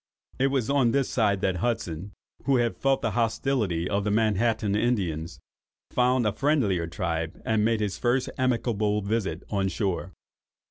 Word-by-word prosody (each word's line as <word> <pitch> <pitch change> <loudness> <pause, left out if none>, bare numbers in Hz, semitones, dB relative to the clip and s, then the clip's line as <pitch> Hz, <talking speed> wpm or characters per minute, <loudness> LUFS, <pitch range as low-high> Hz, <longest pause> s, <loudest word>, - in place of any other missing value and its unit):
It 135 - +4
was 135 -4 0
on 135 -4 +3
this 140 -2 +1
side 100 -5 +2
that 95 -1 +1
Hudson, 100 -4 -2 0.3
who 140 - +3
had 120 -2 +1
felt 135 0 +1
the - - +1
hostility 115 -7 0
of 100 +1 0
the 105 - 0
Manhattan 110 0 +1
Indians, 95 -9 -1 0.5
found 125 -1 +2
a 105 - +1
friendlier 105 - +1
tribe, 80 -1 -3
and 110 -1 +2
made 110 0 +1
his 105 -2 -2
first 125 +2 +1
amicable 110 -5 0
visit 105 0 -2
on 100 -2 +1
shore. 95 -2 -2
110 Hz, 155 wpm, -26 LUFS, 95-125 Hz, 0.5 s, It